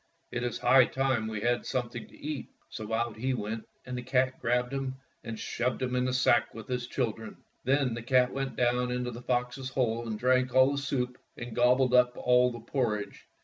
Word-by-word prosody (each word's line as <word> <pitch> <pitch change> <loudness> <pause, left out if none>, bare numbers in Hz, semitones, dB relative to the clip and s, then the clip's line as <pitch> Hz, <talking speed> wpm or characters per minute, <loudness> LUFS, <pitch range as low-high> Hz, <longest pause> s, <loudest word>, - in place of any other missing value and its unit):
It 120 - -2
is 120 -1 -2
high 130 -1 +6
time 130 -5 0
we 110 -1 -4
had 120 +2 +1
something 120 -2 -3
to - - -17
eat." 150 -3 -5 0.2
So 110 0 -7
out 115 0 0
he 130 +4 -1
went, 110 0 -4 0.2
and 125 0 -5
the 125 - -3
cat 130 +1 +1
grabbed 125 +2 +1
him 135 -1 -2 0.3
and 115 -1 -5
shoved 120 +3 -2
him 125 -1 -1
into 125 0 +1
the - - -2
sack 130 - +3
with 115 - -8
his 125 -1 -2
chil 125 -3 0
dren. 110 0 -10 0.3
Then 135 -1 +2
the 120 - -4
cat 125 +1 +3
went 135 0 -3
down 125 0 +1
into 125 0 -2
the 120 +1 -8
fox's 125 +1 -1
hole 120 -3 -1
and 110 -1 -3
drank 130 +1 +2
all 130 +1 +6
the 140 - -1
soup 125 -2 -2 0.2
and 120 -2 -7
gobbled 125 +1 +4
up 125 0 +4
all 125 0 +4
the 120 -1 -8
porridge. 115 -4 -2
125 Hz, 215 wpm, -29 LUFS, 120-130 Hz, 0.3 s, high